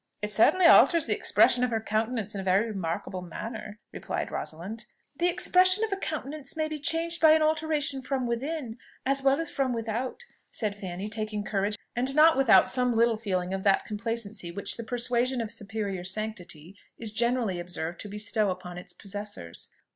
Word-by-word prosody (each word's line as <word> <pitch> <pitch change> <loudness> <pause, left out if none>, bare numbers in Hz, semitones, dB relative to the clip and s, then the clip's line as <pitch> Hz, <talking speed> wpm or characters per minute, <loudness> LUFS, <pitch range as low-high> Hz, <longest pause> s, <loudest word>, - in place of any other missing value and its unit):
"It 210 - -1
certainly 340 - +5
alters 335 0 +7
the - - +1
expression 250 0 +3
of 250 - +2
her 225 -2 0
countenance 220 0 -1
in 200 - -4
a - - -6
very 190 +3 +3
remarkable 185 -2 -4
manner," 210 +4 -7
replied - - -4
Rosalind. 200 +8 -6 0.3
"The 345 +4 +1
expression 370 +3 +4
of 440 -2 -1
a - - +1
countenance 305 -5 -4
may 310 -1 0
be 310 -1 -5
changed 330 +3 0
by 315 -1 +8
an 315 0 +3
alteration 310 -3 +1
from 260 -1 -2
within, 245 0 -3 0.3
as 275 +1 +1
well 275 +1 +3
as 330 -2 -3
from 265 -2 0
without," 235 - -4 0.2
said 210 -3 -3
Fanny, 190 0 -6
taking 215 -1 -3
courage, 205 +1 -1 0.2
and 260 +3 -1
not 315 +1 +7
without 225 -8 +5
some 250 -2 +1
little 230 0 +3
feeling 190 -4 -2
of 190 0 -3
that 195 -1 +3
complacency 215 -4 -3
which 200 +4 -2
the 230 - -6
persuasion 245 +2 0
of 225 -2 -3
superior 205 -3 -4
sanctity 185 -4 -5 0.2
is 220 -2 -4
generally 235 -5 +1
observed 175 -1 -4
to 210 - -5
bestow 210 0 0
upon 180 -1 -6
its 180 0 -10
possessors. 205 - -7
225 Hz, 180 wpm, -27 LUFS, 200-270 Hz, 0.3 s, by